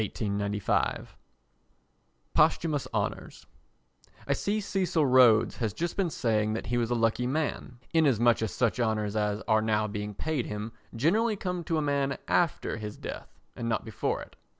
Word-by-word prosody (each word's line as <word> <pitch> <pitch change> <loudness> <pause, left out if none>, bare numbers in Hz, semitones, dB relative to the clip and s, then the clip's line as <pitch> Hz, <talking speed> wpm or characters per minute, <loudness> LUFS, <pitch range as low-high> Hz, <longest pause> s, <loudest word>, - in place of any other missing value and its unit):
] - - +1 2.3
Posthumous 155 -2 +2
Honours - - -3 0.8
I - - +3
see 210 +2 -1
Cecil 185 -6 0
Rhodes 125 -4 +5
has 110 -5 -1
just 170 0 -2
been 190 -3 +1
saying 110 -6 0
that 110 - -4
he 120 +1 0
was 115 -1 0
a 120 - +1
lucky 115 +1 +1
man, 140 -3 -2 0.2
inasmuch 120 -8 +4
as 110 -4 -1
such 125 -1 0
honours 110 -3 0
as 105 0 0
are 110 -1 +4
now 110 -1 +1
being 105 -1 -5
paid 155 -2 -2
him 105 +2 -5 0.2
generally 210 - +2
come 180 -3 -3
to 165 - 0
a 155 - 0
man 140 -1 0
after 170 -9 +1
his 105 -1 -6
death - - -8 0.2
and 115 -1 -3
not 110 - -1
before 110 - -2
it. - - -16
120 Hz, 160 wpm, -28 LUFS, 110-160 Hz, 2.3 s, Rhodes